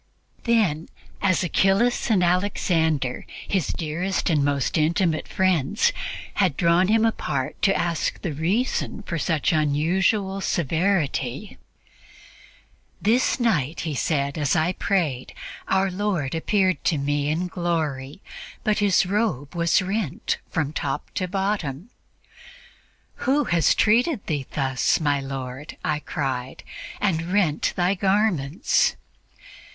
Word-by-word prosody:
Then, 205 -10 +1 0.3
as 185 -2 +2
Achillas 195 +9 +2
and 200 -5 +3
Alexander, 165 -7 +1 0.2
his 185 -8 0
dearest 175 +4 -2
and 150 -3 +2
most 140 -1 0
intimate 160 +1 +1
friends, 185 - +1 0.4
had 185 -9 +1
drawn 170 +1 +3
him 220 +2 +3
apart 140 -11 -2
to 195 - +3
ask 170 -2 -1
the 160 - -2
reason 200 - -1
for 170 -4 -3
such 155 -1 +1
unusual 185 +7 +1
severity 165 - -1 1.4
"This 235 +6 +2
night," 165 - 0
he 160 -2 -3
said, 140 +1 -1
"as 145 0 +1
I 165 +2 +2
prayed, 160 -11 -1 0.3
Our 190 0 +2
Lord 185 -8 -1
appeared 185 +3 +1
to 160 - +2
me 145 +1 0
in 165 +4 0
glory, 160 -4 -3 0.4
but 215 -1 +1
His 200 -2 +3
robe 190 - -1
was 170 +2 +2
rent 195 -4 -2
from 155 -2 -2
top 140 -2 -3
to 185 - -2
bottom. 190 - -2 1.3
'Who 280 +3 +1
has 170 - +2
treated 235 +3 +2
Thee 145 -5 -2
thus, 135 0 +1
my 145 -3 +1
Lord!' 135 +1 -6
I 150 -1 0
cried, 130 -4 -4 0.4
'and 170 -4 0
rent 185 -7 +1
Thy 180 +1 +2
garments?' 190 -6 +1
170 Hz, 120 wpm, -24 LUFS, 145-195 Hz, 1.4 s, and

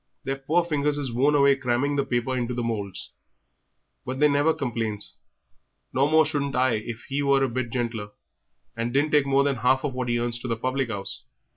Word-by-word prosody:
Their 135 0 -2
poor 160 +6 +1
fingers 150 -2 0
is 135 -5 -3
worn 140 +5 +3
away 140 -1 +5
cramming 135 +2 0
the 140 - +2
paper 120 +1 -1
into 125 -1 -2
the 120 - -2
moulds; 105 -4 -4 0.9
but 130 - -5
they 150 - +6
never 145 +2 +3
complains, 115 -7 -3 0.7
no 135 +2 +3
more 160 +1 +5
shouldn't 145 -2 -1
I 130 0 +3
if 110 +1 -4
he 140 +1 -1
was 140 -1 +3
a - - +3
bit 125 0 -3
gentler 115 -4 -3 0.7
and 115 +1 -2
didn't 145 +4 +1
take 145 -2 +4
more 140 0 +4
than 140 -2 0
half 130 +3 +2
of 145 -3 -2
what 125 -1 -3
he 120 - +2
earns 120 0 -2
to 125 - -6
the 115 -2 -1
public 130 +2 -1
'ouse. 100 -3 -4
130 Hz, 210 wpm, -25 LUFS, 120-140 Hz, 0.9 s, they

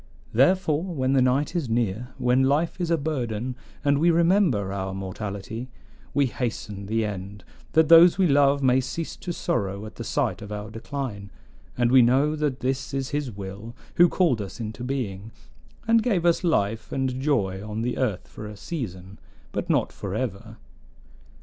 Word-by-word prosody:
Therefore, 155 +4 +3
when 135 -8 -1
the 135 - +4
night 130 +6 +1
is 155 -8 -1
near, 115 0 0
when 125 +1 +2
life 150 +7 +1
is 170 - -1
a 165 - +3
burden 125 -5 -3 0.3
and 140 0 +3
we 170 +3 +4
remember 165 - +3
our 95 -1 -3
mortality, 100 +5 -5 0.4
we 145 - +2
hasten 110 -5 -4
the 110 +1 0
end, 100 -1 -6 0.3
that 160 -1 +5
those 170 +2 +8
we 190 - +4
love 140 -2 +4
may 130 0 +4
cease 155 +5 -5
to 175 - -5
sorrow 105 - -2
at 110 - -11
the 115 - -5
sight 125 -3 -1
of 105 0 -8
our 105 +1 -5
decline; 115 -4 -5 0.5
and 120 -1 +2
we 130 -1 +8
know 135 +6 +3
that 150 -4 -2
this 130 +1 -2
is 135 -1 -2
his 145 -2 -2
will 100 +3 -8 0.2
who 175 0 +7
called 160 - +2
us 100 +2 -7
into 115 +2 -5
being, 115 -6 -4 0.6
and 230 0 +5
gave 200 -8 +1
us 170 +1 +3
life 110 - 0
and 130 -1 -1
joy 100 -10 0
on 110 +1 -4
the 125 +1 -2
earth 110 -8 -1
for 105 - -9
a 105 -1 -9
season, 100 - -6 0.3
but - - -4
not - - +1
forever. 110 +1 -4
125 Hz, 175 wpm, -25 LUFS, 105-145 Hz, 0.6 s, those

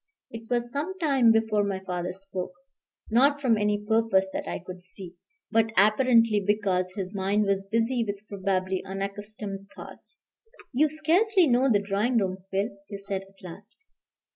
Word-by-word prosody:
It 225 0 -9
was 240 -1 0
some 315 +8 -3
time 275 -9 +4
before 220 -2 +2
my 195 -2 -2
father 180 -1 -3
spoke, 185 -1 -6 0.6
not 280 +5 +4
from 255 -5 +3
any 210 0 0
purpose 220 -3 +2
that - - -4
I - - -2
could 180 +1 -10
see, 185 -1 -9 0.4
but 225 0 +3
apparently 230 +1 +5
because 190 -3 +1
his 195 -1 -4
mind 200 +2 +1
was 195 0 0
busy 230 +3 +1
with 205 -1 -6
probably 190 -1 -1
unaccustomed 200 +1 -5
thoughts. 475 - -7 0.4
"You 300 +5 +3
scarcely 345 +6 +3
know 260 -1 +3
the 210 - +5
drawing 210 +5 +1
room, 190 -3 0
Phil," 200 +1 -2
he 200 -1 -6
said 195 -1 -4
at 195 -1 -25
last. 200 - -11
205 Hz, 160 wpm, -27 LUFS, 195-235 Hz, 0.6 s, apparently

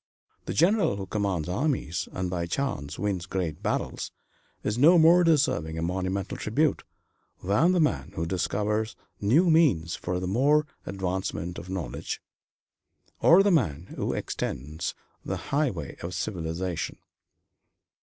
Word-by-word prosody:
The - - -2
general 185 - +3
who 100 -1 -5
commands 95 -5 -1
armies, 110 - -1
and 95 -1 -2
by 85 -1 -2
chance 85 - -2
wins 95 -2 -2
great 90 -6 -3
battles, - - -2 0.5
is 105 - 0
no 165 +6 +7
more 170 +2 +7
deserving 145 - +2
a 80 - -2
monumental 95 +2 -2
tribute 145 +7 +1 0.6
than 105 - +3
the 185 - +2
man 70 - 0
who 85 - -1
discovers 105 +5 -1 0.2
new 155 - +4
means 120 - +3
for 90 0 -3
the 90 - -3
more 135 +10 +3 0.2
rapid 100 - -5
advancement 90 -2 -3
of 90 - -10
knowledge, 85 -10 -4 1.0
or 180 +4 +7
the 205 - +3
man 90 - 0
who - - -1
extends 75 +6 -3 0.3
the - - -3
highway 140 - -2
of 90 +2 -6
civilization. 85 -2 -3
95 Hz, 135 wpm, -27 LUFS, 85-145 Hz, 1.0 s, no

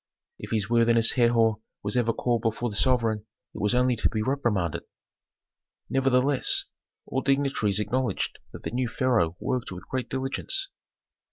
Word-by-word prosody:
If - - -8
his 105 -3 0
worthiness 115 0 +4
Herhor 115 -3 +3 0.2
was 105 +2 -2
ever 120 -2 +2
called 120 0 0
before 115 +1 -1
the - - -5
sovereign 110 -2 +1 0.3
it - - -7
was 105 +4 +2
only 125 0 +3
to - - +1
be 110 -1 -2
reprimanded. 110 - 0 1.1
Nevertheless, 135 0 +2 0.4
all 130 - -2
dignitaries 135 -7 +1
acknowledged 115 0 -1
that - - -10
the - - -4
new 125 +1 -1
pharaoh 115 - +1
worked 125 -5 -2
with 90 0 -9
great 130 -1 -3
diligence. 135 - -1
120 Hz, 150 wpm, -26 LUFS, 110-130 Hz, 1.1 s, worthiness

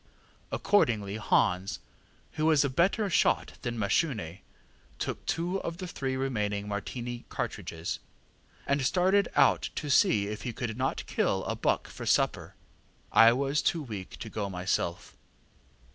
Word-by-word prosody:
Accordingly 110 - +2
Hans, 95 -3 +1 0.5
who 155 0 0
was 150 -3 +4
a 140 - -1
better 190 +9 +2
shot 185 - +1
than 120 -2 -3
Mashune, 100 - 0 0.6
took - - -4
two 175 +3 0
of 170 0 -4
the 185 - -5
three 135 -6 -3
remaining 105 -6 -1
Martini 120 +4 -5
cartridges, 80 0 -4 0.7
and 140 0 +1
started 190 +7 +3
out 140 -1 +4
to 150 -2 -3
see 105 -6 +4
if 105 0 -5
he 120 - -4
could 115 -2 -4
not 130 +3 -2
kill - - 0
a - - -2
buck - - 0
for - - -8
supper. - - +1 0.6
I 115 0 +8
was 140 +3 0
too 160 +2 0
weak 105 -8 -7
to 110 - -7
go 100 -2 -3
myself. 90 -2 -2
120 Hz, 145 wpm, -29 LUFS, 105-150 Hz, 0.7 s, I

